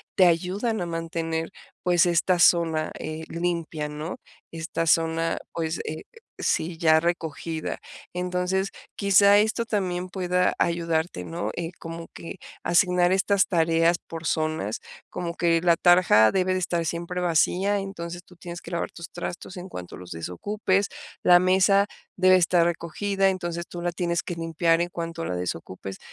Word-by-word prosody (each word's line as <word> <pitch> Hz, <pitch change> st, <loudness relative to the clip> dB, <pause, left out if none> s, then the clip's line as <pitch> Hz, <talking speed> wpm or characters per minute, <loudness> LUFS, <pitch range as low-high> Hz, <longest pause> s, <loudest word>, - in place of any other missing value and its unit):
te 185 Hz, -, +6 dB
ayudan 190 Hz, +7 st, 0 dB
a 175 Hz, -, -2 dB
mantener, 165 Hz, 0 st, -3 dB, 0.3 s
pues, 180 Hz, +1 st, +4 dB
esta 175 Hz, +1 st, +2 dB
zona, 165 Hz, -3 st, +4 dB
eh, 155 Hz, +1 st, -5 dB
limpia, 170 Hz, -3 st, -2 dB
¿no?, 150 Hz, +3 st, -5 dB, 0.3 s
esta 165 Hz, 0 st, -3 dB
zona, 165 Hz, +1 st, +2 dB
pues, 165 Hz, 0 st, -2 dB
eh, 155 Hz, +1 st, -5 dB, 0.4 s
sí 165 Hz, +1 st, 0 dB
ya 160 Hz, -2 st, +5 dB
recogida, 165 Hz, -1 st, -3 dB, 0.3 s
entonces 180 Hz, +2 st, -1 dB, 0.3 s
quizá 200 Hz, +1 st, +6 dB
esto 220 Hz, +2 st, +1 dB
también 185 Hz, -5 st, -1 dB
pueda 180 Hz, -1 st, +1 dB
ayudarte, 165 Hz, -, 0 dB
¿no?, 90 Hz, +5 st, -3 dB
eh, 165 Hz, -1 st, -4 dB
como 165 Hz, 0 st, -7 dB
que 170 Hz, -, -8 dB, 0.2 s
asignar 180 Hz, 0 st, +3 dB
estas 195 Hz, +1 st, +3 dB
tareas 165 Hz, 0 st, +3 dB
por 165 Hz, -2 st, -7 dB
zonas, 155 Hz, -9 st, -1 dB, 0.3 s
como 170 Hz, -1 st, -4 dB
que 170 Hz, -1 st, +2 dB
la 170 Hz, -2 st, +4 dB
tarja 175 Hz, -12 st, +6 dB
debe 185 Hz, -1 st, +1 dB
de 185 Hz, -, 0 dB
estar 170 Hz, -2 st, -1 dB
siempre 170 Hz, +2 st, -3 dB
vacía, 180 Hz, +4 st, +2 dB
entonces 175 Hz, -3 st, -6 dB
tú 180 Hz, -, -19 dB
tienes 175 Hz, 0 st, -8 dB
que -, -, -10 dB
lavar 170 Hz, -, -3 dB
tus 170 Hz, -1 st, -9 dB
trastos 175 Hz, +1 st, -6 dB
en 180 Hz, +1 st, -7 dB
cuanto 90 Hz, -, -8 dB
los 90 Hz, -1 st, -11 dB
desocupes, 190 Hz, -, -1 dB, 0.3 s
la 175 Hz, 0 st, +7 dB
mesa 190 Hz, +2 st, +4 dB, 0.3 s
debe 185 Hz, 0 st, +6 dB
estar 175 Hz, -1 st, +4 dB
recogida, 195 Hz, +4 st, 0 dB
entonces 175 Hz, -2 st, -3 dB
tú 175 Hz, -, -7 dB
la 175 Hz, 0 st, -1 dB
tienes 170 Hz, -1 st, -1 dB
que 175 Hz, -, -5 dB
limpiar 165 Hz, 0 st, +1 dB
en 175 Hz, -, -1 dB
cuanto 165 Hz, -1 st, -5 dB
la -, -, -2 dB
desocupes, 90 Hz, +2 st, -5 dB
170 Hz, 155 wpm, -25 LUFS, 165-180 Hz, 0.4 s, la